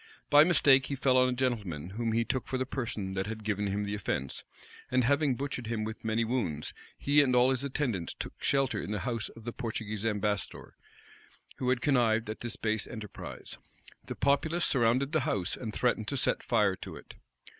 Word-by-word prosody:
By 145 +1 +9
mistake, 140 -5 +5
he 140 - -2
fell 130 -1 +2
on 130 0 +5
a - - 0
gentleman 105 - -2
whom 115 +2 -1
he 115 +1 +2
took 130 0 -2
for 130 - -1
the 130 - -1
person 110 -7 -3
that 95 +1 -2
had 110 0 -5
given 105 -1 -1
him 100 +1 -1
the 100 0 -3
offence; 70 -10 -3 0.5
and 130 0 +3
having 140 +1 +3
butchered 130 -3 -4
him 110 -1 -1
with 110 +1 -6
many 110 +1 +1
wounds, 100 - -2 0.2
he 145 +1 +4
and 130 -3 +2
all 125 +1 +5
his 130 0 -1
attendants 130 - -2
took - - -7
shelter 135 -2 +2
in - - -6
the 105 -2 -2
house 115 -2 -2
of 115 - -13
the 120 +1 -5
Portuguese 110 -3 -4
ambassador, 105 -2 -2 0.8
who 125 - -1
had 125 -1 +2
connived 115 -6 +2
at 110 - -7
this 120 -2 -5
base 110 -1 -1
enterprise.[] 110 -3 -8 0.5
The - - -4
populace 155 +5 +2
surrounded 130 +2 +2
the 160 - +3
house, 105 - -1
and 110 -3 -5
threatened 110 -1 0
to 140 - -2
set 130 - +1
fire 105 -5 +2
to - - -8
it. - - -12
115 Hz, 200 wpm, -30 LUFS, 105-130 Hz, 0.8 s, By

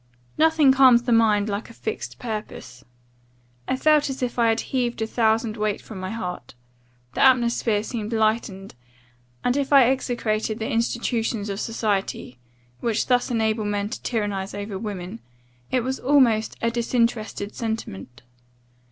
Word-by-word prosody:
"Nothing 315 -3 +4
calms 260 -3 +6
the 245 - -1
mind 220 -3 +3
like 205 +2 -4
a 230 - -14
fixed 220 - -5
purpose. 210 - -7 0.8
I - - +1
felt 300 +1 +3
as 265 -1 -4
if 245 0 -3
I 230 - +4
had 225 +1 +1
heaved 245 -3 0
a - - 0
thousand 220 0 +1
weight 210 -1 -1
from 215 -4 -10
my 185 0 -4
heart; 180 - -6 0.6
the - - -2
atmosphere 235 -4 +3
seemed 220 -2 -5
lightened; 215 -3 -1 0.7
and, 245 - +1
if 280 -1 -1
I 275 -4 +7
execrated 220 -4 -1
the 220 - -3
institutions 230 -2 -1
of 200 0 -3
society, 205 - -2 0.4
which 230 -2 0
thus 250 -1 +2
enable 220 -2 0
men 205 0 -2
to 245 - -6
tyrannize 205 -4 -2
over 205 -1 -5
women, 200 0 -6 0.5
it 255 - +1
was 260 +2 -3
almost 245 -6 +3
a 230 - +2
disinterested 230 -3 -1
sentiment. 125 - -5
225 Hz, 150 wpm, -23 LUFS, 210-245 Hz, 0.8 s, I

